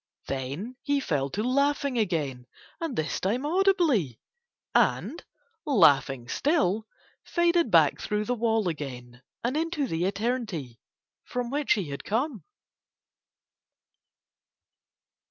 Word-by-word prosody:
Then 140 - -4
he 285 -1 +1
fell 145 - -1
to 205 +10 -2
laughing 280 +1 +1
again 145 - -1 0.3
and 325 -6 -3
this 155 -3 -1
time 235 +9 -1
audibly; 320 - +2 0.5
and, - - +1 0.4
laughing 145 - +4
still, 225 - +1 0.4
faded 345 -4 +2
back 160 -6 +4
through 210 0 -1
the 245 - 0
wall 225 -3 +1
again 125 -6 -6 0.2
and 245 +4 0
into 325 -2 0
the 170 -6 -1
eternity 200 - -2 0.5
from 245 -1 -3
which 290 0 +2
he 195 -9 -3
had 140 - -6
come. 235 - -1
215 Hz, 110 wpm, -27 LUFS, -, 0.5 s, laughing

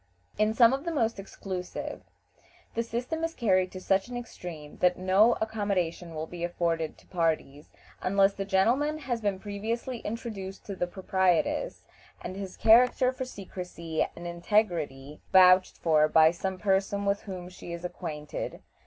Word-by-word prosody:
In 215 +1 +2
some 235 +1 +6
of 275 +1 -2
the 335 - -2
most 230 -9 0
exclusive, 190 -2 -6 0.7
the 230 - 0
system 245 +8 -3
is 330 0 -2
carried 185 -5 +2
to 185 - -6
such 195 +2 +1
an 245 0 -5
extreme 170 -10 -8
that 180 0 +3
no 190 +5 +4
accommodation 195 -6 -2
will 155 0 -3
be 170 +1 -7
afforded 170 -2 -1
to - - -21
parties 160 -4 -1 0.3
unless 195 +1 +3
the 195 - -3
gentleman 240 +11 +2
has 250 -6 -3
been 205 -2 0
previously 225 +5 -4
introduced 210 -4 -6
to 200 - -5
the 180 - -1
proprietress, 190 - 0 0.4
and 185 - -6
his 195 -1 -7
character 250 +3 +5
for 260 0 -5
secrecy 180 -7 -4
and 170 - -9
integrity 170 -6 -1
vouched 185 0 +6
for 155 -2 +3
by 160 +1 +6
some 190 +2 -4
person 200 +1 +1
with 200 0 +1
whom 185 -3 -7
she 180 -1 -10
is 170 +1 -6
acquainted. 150 -4 -5
190 Hz, 155 wpm, -28 LUFS, 175-220 Hz, 0.7 s, some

